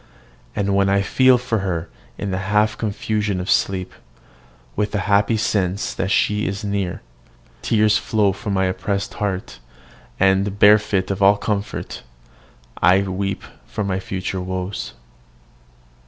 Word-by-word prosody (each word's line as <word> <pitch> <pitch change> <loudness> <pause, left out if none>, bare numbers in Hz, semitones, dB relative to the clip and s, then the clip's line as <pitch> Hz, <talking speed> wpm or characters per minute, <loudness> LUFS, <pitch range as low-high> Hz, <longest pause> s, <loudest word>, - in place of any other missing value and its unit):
And 100 -1 0
when 100 0 +3
I 100 0 +2
feel 130 +4 +4
for 120 -3 -1
her 85 -4 -2 0.3
in 100 - -3
the 95 - -1
half 105 0 +2
confusion 105 -2 -2
of 90 - -2
sleep, 95 -1 0 0.8
with 105 0 -1
the 105 - 0
happy 105 +2 +2
sense 100 -3 -1
that 95 - -2
she 105 +1 +1
is 100 +1 -4
near, 100 -3 -2 0.6
tears 110 0 +3
flow 105 -3 +1
from 100 +1 -4
my 95 0 +2
oppressed 100 +2 -2
heart; 95 -9 -3 0.6
and, 95 +1 +2
bereft 105 -2 +4
of 100 0 -3
all 100 +1 +6
comfort, 100 -1 -3 0.8
I 95 +2 +5
weep 95 0 -3 0.3
over 105 - -2
my 95 -1 -1
future 95 0 -4
woes. 95 +1 -4
100 Hz, 140 wpm, -21 LUFS, 95-105 Hz, 0.8 s, all